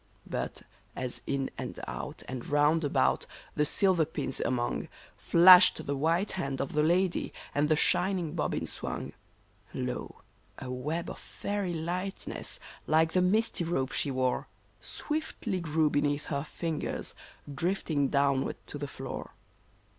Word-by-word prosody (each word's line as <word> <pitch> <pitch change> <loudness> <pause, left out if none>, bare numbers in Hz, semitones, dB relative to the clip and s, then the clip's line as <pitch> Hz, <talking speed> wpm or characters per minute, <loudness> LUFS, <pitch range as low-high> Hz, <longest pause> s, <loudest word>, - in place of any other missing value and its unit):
But, - - -4 0.3
as 125 -2 -4
in 135 -1 -1
and - - -5
out - - -6
and 130 -2 -5
round 150 +3 +3
about, 65 - +2 0.3
the 150 0 +2
silver 185 0 +4
pins 150 -4 -3
among, 120 -2 -1 0.3
Flashed 180 +1 +7
the 140 - -1
white 165 +8 +1
hand 140 -7 -3
of 135 - -2
the 150 - +3
lady, 175 +3 +2 0.2
and 145 +1 +2
the 155 - +5
shining 175 0 +1
bobbins 170 - -1
swung, - - -5 0.6
Lo! - - -4 0.4
a 130 -1 -6
web 150 +7 -2
of - - -9
fairy 200 -4 -3
lightness 180 +4 -4 0.3
like 160 +1 +4
the 185 - +4
misty 200 +1 +2
robe 135 -6 -1
she 145 - 0
wore, 130 -1 0 0.3
Swiftly 300 -10 -3
grew 160 -2 +2
beneath 145 0 +1
her 140 0 0
fingers, 160 -1 -3 0.4
drifting 155 -2 0
downward 140 -1 +2
to - - -6
the - - -3
floor - - -7
155 Hz, 140 wpm, -30 LUFS, 140-180 Hz, 0.6 s, Flashed